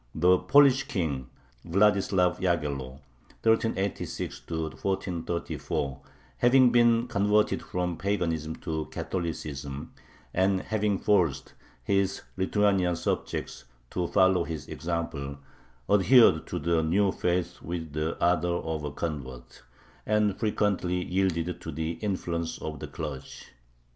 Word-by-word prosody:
The 90 +3 +4
Polish 140 -1 +5
king 70 -9 -2 0.3
Vladislav 95 0 +2
Yaghello 70 -7 -2 0.4
(1386 110 -3 0
1434), 80 -3 -3 0.4
having 125 0 +6
been 120 0 +4
converted 105 0 +2
from 90 -2 -3
paganism 85 -6 -1
to 80 -3 -3
Catholicism, 75 -6 -5 0.4
and 95 +1 +2
having 105 -2 0
forced 90 -10 +1 0.3
his 100 -1 0
Lithuanian 95 -2 +2
subjects 75 - -3 0.3
to 90 -1 -1
follow 95 -1 +4
his 80 -4 -6
example, 80 -5 -4 0.5
adhered 105 -4 +5
to - - -3
the 85 -1 +1
new 95 +5 +2
faith 90 -1 -1
with 80 -2 -5
the 75 +2 -2
ardor 85 0 +2
of 80 -3 -3
a 75 - -2
convert, 65 -7 -6 0.5
and 105 -2 +2
frequently 100 -5 0
yielded 90 -2 -1
to 80 - -6
the 80 +2 -2
influence 85 -5 -2
of 75 -2 -5
the - - -6
clergy. 70 -4 -7
90 Hz, 110 wpm, -28 LUFS, 80-100 Hz, 0.5 s, having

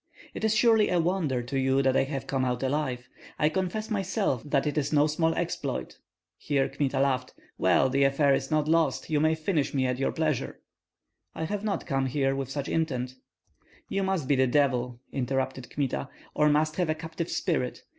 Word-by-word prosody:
"It - - -6
is 220 0 +2
surely 220 -2 +4
a 180 - +2
wonder 165 -8 0
to 135 +3 -2
you 135 +1 +2
that 130 0 +2
I - - +3
have 135 -1 -4
come 135 -1 -1
out 125 0 -1
alive. 130 -3 -1 0.3
I 150 - +3
confess 190 +6 -2
myself 195 - 0
that 145 -1 0
it 150 - -1
is 150 -2 0
no 150 -1 +4
small 160 +2 +1
exploit." - - -3 0.4
Here 140 -2 +1
Kmita 135 -2 -1
laughed. 130 -2 0 0.2
"Well, - - +4
the 135 +1 +2
affair 140 +1 +3
is - - -1
not 155 -1 +1
lost. 165 0 +1
You 150 - +3
may 155 +1 +3
finish 155 -3 -1
me 130 -1 +2
at 125 0 -1
your 135 - +1
pleasure." 155 -5 -2 0.8
"I - - -3
have 205 +5 -3
not 210 -2 -2
come 135 -3 0 0.3
with 135 -2 -3
such 140 0 -3
intent 130 -6 -1 0.4
" - - -32
"You 195 - 0
must 190 -7 -1
be 145 - +3
the 130 0 +3
devil," 125 -3 +1
interrupted 130 -1 -2
Kmita, 130 - -2 0.2
"or 150 - +3
must 155 +1 +1
have 175 -3 +1
a 155 - +1
captive 160 +1 -5
spirit. 150 -9 -1
145 Hz, 195 wpm, -27 LUFS, 135-160 Hz, 0.8 s, surely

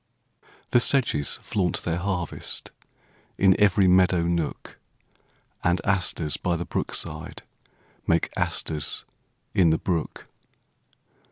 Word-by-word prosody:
The - - +5
sedges 120 - +2
flaunt 90 -5 -1
their 85 0 -1
harvest, 90 -2 -3 0.7
In 95 -1 +5
every 100 -2 +4
meadow 90 -1 +4
nook; 85 -2 -3 0.8
And 90 0 +2
asters 85 -5 +1
by 90 -1 -1
the 85 +1 -4
brook - - -3
side - - -5 0.6
Make 85 0 +2
asters 75 -3 -2 0.5
in 90 -3 +4
the 80 - +3
brook. 85 -3 -3
90 Hz, 105 wpm, -25 LUFS, 85-95 Hz, 0.8 s, The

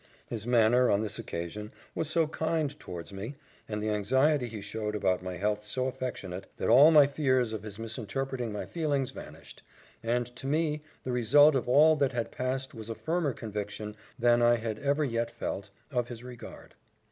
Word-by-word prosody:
His 110 -1 -6
manner, 120 +1 +4
on 100 - +3
this 110 +1 -3
occasion, 105 +1 -5 0.2
was 160 - -2
so 165 0 +3
kind 160 -1 -1
towards 90 +2 -8
me, 105 +8 -6 0.3
and 105 -1 -3
the 110 - 0
anxiety 130 +6 +2
he 110 -2 -7
showed 105 +1 -4
about 95 -3 +1
my 90 -1 -5
health 105 +3 0
so 130 +5 -2
affectionate, 110 -8 -4
that - - -1
all 145 +5 +9
my 150 -3 +8
fears 130 -5 +1
of 110 - -4
his 105 -1 -8
misinterpreting 115 +2 -3
my 105 - -4
feelings 145 -6 -1
vanished; - - -11 0.4
and 120 +1 0
to 135 - -5
me 150 +1 +1 0.2
the 130 - -3
result 140 +6 +6
of 130 -2 -1
all 155 +4 +6
that 140 -2 +1
had 120 -2 -2
passed 130 +1 -3
was 110 -2 -8
a 115 - -3
firmer 160 -2 -1
conviction, 105 -1 -5 0.2
than 120 0 +4
I 120 0 +6
had 110 -2 -3
ever 145 +2 +1
yet 115 -2 -1
felt, - - -5 0.2
of 120 -1 0
his 120 -1 -8
regard. 125 -2 -10
120 Hz, 185 wpm, -29 LUFS, 105-135 Hz, 0.4 s, all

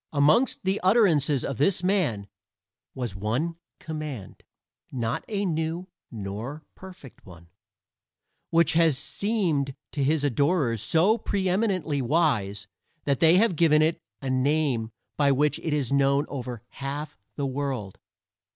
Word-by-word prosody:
Amongst 155 - +3
the 190 +2 0
utterances 170 - +3
of 135 -3 -4
this 170 +4 +2
man 160 - 0 0.7
was 120 -6 -3
one 125 - -2 0.2
command 155 - -7 0.5
not 120 -2 -2
a 205 -2 -2
new 165 +2 -2 0.2
nor 110 +8 -6
perfect 180 -9 -13
one 85 -2 -15 1.0
which 165 -1 +3
has 160 -4 +4
seemed 165 - -1 0.2
to 140 - -1
his 150 +2 +1
adorers 140 - +1
so 185 - +3
preeminently 185 -6 0
wise 120 -9 0 0.4
that 140 -2 0
they 165 +2 +6
have 215 -3 +3
given 155 -1 +4
it 160 +1 +1 0.2
a 135 - -2
name 130 -3 +1 0.3
by 145 -2 +3
which 145 +2 +1
it 160 - -3
is 145 -3 -1
known 140 +1 +3
over 125 -4 -6
half 140 +2 -6 0.2
the 140 - -2
world. 130 -7 -4
145 Hz, 130 wpm, -26 LUFS, 130-170 Hz, 1.0 s, they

